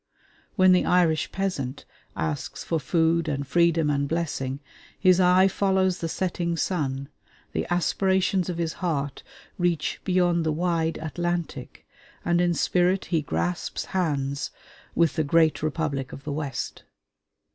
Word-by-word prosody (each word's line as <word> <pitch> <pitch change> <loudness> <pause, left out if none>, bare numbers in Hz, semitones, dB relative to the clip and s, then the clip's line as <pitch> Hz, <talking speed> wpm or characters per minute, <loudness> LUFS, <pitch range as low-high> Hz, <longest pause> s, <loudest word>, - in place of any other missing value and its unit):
When 185 0 +6
the 180 - +5
Irish 165 -3 +2
peasant 150 -9 -3 0.3
asks 80 -2 -3
for 165 - -1
food 165 +1 +1
and 140 -2 -2
freedom 165 +1 +3
and 140 0 0
blessing, 140 -5 -2 0.4
his 185 -1 +5
eye 185 +1 +6
follows 190 -1 +1
the 165 - -3
setting 170 -1 -1
sun, 140 -7 -1 0.4
the - - -3
aspirations 190 +1 +1
of 175 - -3
his 165 -1 -1
heart 145 -6 -2 0.4
reach 170 -5 0
beyond 175 -2 +2
the 160 - +1
wide 165 0 0
Atlantic, 170 -3 -4 0.4
and 175 0 +3
in 175 -1 +2
spirit 180 +3 +2
he 160 - +3
grasps 175 +4 -2
hands 140 -6 -1 0.5
with 170 0 +2
the 160 - +3
great 160 +1 +3
Republic 150 -4 -2
of 140 - -9
the 145 - -3
West. 145 -4 -4
165 Hz, 135 wpm, -25 LUFS, 150-180 Hz, 0.5 s, When